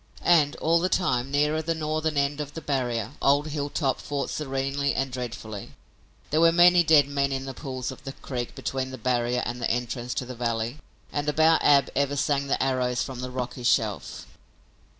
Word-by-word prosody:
And, 155 -4 +4
all 165 +2 +2
the 180 +2 0
time, 130 -9 +1
nearer 150 +2 +1
the 165 +1 -1
northern 155 -1 -1
end 140 +1 0
of 145 0 -7
the - - -3
barrier, 125 -6 -1
old 145 +2 +3
Hilltop 145 -2 -1
fought 145 -1 -3
serenely 135 0 -1
and 135 -1 -1
dreadfully. 115 -5 -6 0.6
There 155 +2 +3
were 165 0 +6
many 175 +1 +6
dead 155 -3 +5
men 140 -1 0
in 135 0 -3
the 135 - -5
pools 130 -2 -5
of - - -12
the 135 - -6
creek 125 -4 -5
between 130 -1 -3
the 130 - -7
barrier 120 0 0
and 120 +1 -4
the 120 - 0
entrance 120 0 -2
to 130 - -2
the 125 - -7
valley. 115 +2 -2 0.3
And 145 0 -1
about 160 +2 +4
Ab 140 -2 +5
ever 140 0 +1
sang 140 0 0
the 135 - +1
arrows 125 -1 0
from 130 -2 -7
the 125 0 -4
rocky 125 0 -5
shelf. 110 - 0
135 Hz, 190 wpm, -26 LUFS, 125-150 Hz, 0.6 s, were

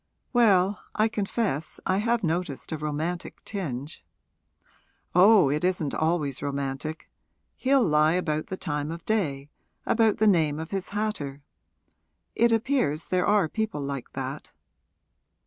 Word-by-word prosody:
'Well, 200 -5 +4 0.2
I 215 +1 +3
confess 200 - -2
I 185 - +2
have 230 +1 +1
noticed 165 -4 -2
a 160 - -2
romantic 155 +4 -4
tinge 145 - -5 0.5
' - - -38
'Oh, 185 -4 +6
it 150 +3 -1
isn't 180 -6 0
always 155 -4 0
romantic. 140 +2 -4 0.5
He'll 265 0 +3
lie 155 0 +4
about 155 -4 -1
the 190 - -5
time 150 -3 -3
of 165 +1 -7
day, 145 -10 -1 0.3
about 225 -2 +3
the 220 - +2
name 160 -7 +3
of 160 +1 -6
his 195 -2 -3
hatter. 155 -10 -3 0.9
It 235 0 +4
appears 225 - +1
there 180 -1 0
are 205 -4 +4
people 220 -4 -3
like 140 -2 -5
that.' - - -5
170 Hz, 135 wpm, -26 LUFS, 150-210 Hz, 0.9 s, Oh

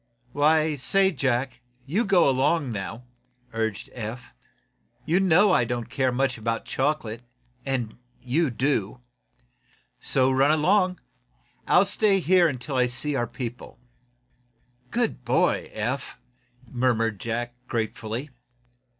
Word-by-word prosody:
"Why, 155 +2 +2
say, 190 +9 +2
Jack, 130 -4 -1 0.2
you 185 - 0
go 190 -5 +4
along 135 +1 +1
now," 110 +3 -5 0.5
urged 110 -2 -3
Eph. 120 +1 -7 0.7
"You 170 +4 +2
know 190 +2 +4
I 125 - +4
don't 120 0 -4
care 130 -1 +1
much 130 -1 0
about 115 +1 -2
chocolate, 130 -5 -2 0.5
and 120 -4 -3 0.2
you 135 +6 0
do. 125 -3 -1 1.0
So 130 0 +2
run 135 +2 +3
along. 180 +4 +2 0.7
I'll 180 +3 +5
stay 200 0 +2
right 190 - 0
here 180 -1 +5
until 130 -1 -4
I 125 0 +3
see 135 +4 -1
our 120 -2 0
people." 120 0 -7 1.1
"Good 230 - -1
boy, 125 +2 +1
Eph!" 125 +5 -3 0.5
murmured 115 -4 0
Jack, 120 +2 -3
gratefully. 115 +4 -3
130 Hz, 120 wpm, -25 LUFS, 120-155 Hz, 1.1 s, I'll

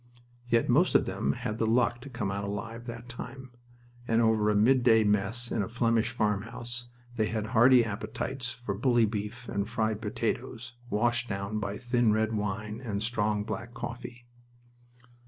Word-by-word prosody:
Yet 115 -1 +2
most 150 +9 +3
of - - +5
them 70 - -1
had 110 - -4
the 115 - +2
luck 120 +1 +2
to 140 - -9
come 115 -6 -3
out 100 +1 -3
alive 110 +4 -5
that 115 0 -7
time, 130 +2 -8 0.6
and 115 0 +3
over 110 -2 +3
a 105 - +2
midday 115 0 +5
mess 105 +4 0
in 110 - +1
a 100 - -3
Flemish 115 -1 +1
farmhouse 120 +2 -2 0.3
they 110 -1 +2
had 110 0 -2
hearty 120 +1 +7
appetites 120 +4 -3
for 120 -4 -4
bully 120 +2 +3
beef 105 +2 -4
and 100 +1 -2
fried 110 -2 -1
potatoes, 115 +3 -3 0.2
washed 120 +3 +1
down 100 +1 -2
by 100 -1 -3
thin 120 -2 +2
red 110 +1 +1
wine 105 +2 -3
and 105 -3 -2
strong 105 -2 0
black 120 +3 -6
coffee. 120 0 -7
115 Hz, 165 wpm, -29 LUFS, 105-120 Hz, 0.6 s, hearty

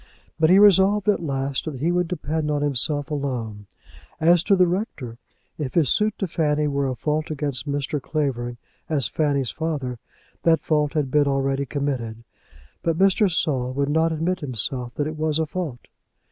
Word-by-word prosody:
But 160 0 +4
he 185 - +7
resolved 200 0 +5
at 205 -4 +3
last 135 -3 -2
that 155 -3 -4
he 165 +5 +1
would 180 0 +1
depend 160 -2 -2
on 145 -1 0
himself 145 +2 0
alone. 120 -8 -4 0.5
As 170 +1 +5
to 200 - +4
the 185 -1 +5
rector, 170 - -3 0.4
if 140 -4 -4
his 160 -7 +3
suit 215 0 +2
to 195 - -1
Fanny 150 -2 0
were 140 -1 0
a 130 - -2
fault 150 +5 -2
against 145 -2 -2
Mr. 145 0 -2
Clavering 125 -6 -2 0.3
as 140 -8 +1
Fanny's 140 -4 0
father, 140 -7 -3 0.4
that 165 -2 +4
fault 150 -2 +1
had 145 -4 -1
been 145 0 +3
already 135 0 0
committed. 125 -5 -3 0.6
But 165 -1 0
Mr. 195 +1 +3
Saul 130 -6 0
would 140 +1 0
not 160 +2 +2
admit 165 +4 -1
to 145 - -6
himself 125 0 -3
that 145 - -1
it 155 +1 -5
was 155 -1 0
a 160 - +1
fault. 150 -6 -5
150 Hz, 180 wpm, -23 LUFS, 135-160 Hz, 0.6 s, he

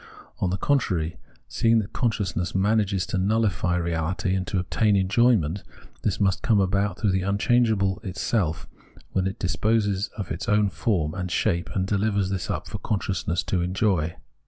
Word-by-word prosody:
On 90 - +1
the 95 - -1
con 140 +8 +3
trary, 85 -8 -2 0.3
seeing 115 0 +2
that 105 -3 -2
consciousness 100 -8 -1
manages 100 -1 +1
to - - -2
nulhfy 95 -3 +1
reahty 85 +3 -1
and 95 -1 -2
to - - -1
obtain 105 +3 +1
enjoyment, 100 -3 +2 0.4
this 100 - -1
must 95 -3 +1
come 110 -3 +3
about 100 0 +1
through 105 -4 +1
the 95 0 +1
unchangeable 100 0 +2
itseK 90 -3 -1 0.5
when 95 0 0
it 95 +4 -4
disposes 105 +1 0
of 100 -5 -5
its 85 +8 -4
own 105 -2 +3
form 85 -10 0
and 90 -1 -4
shape 85 -1 0
and 95 -1 +1
dehvers 100 -1 0
this 95 -2 -3
up - - -3
for - - -6
consciousness 95 -4 -1
to 90 - -1
enjoy. 90 -3 0
95 Hz, 165 wpm, -25 LUFS, 90-105 Hz, 0.5 s, con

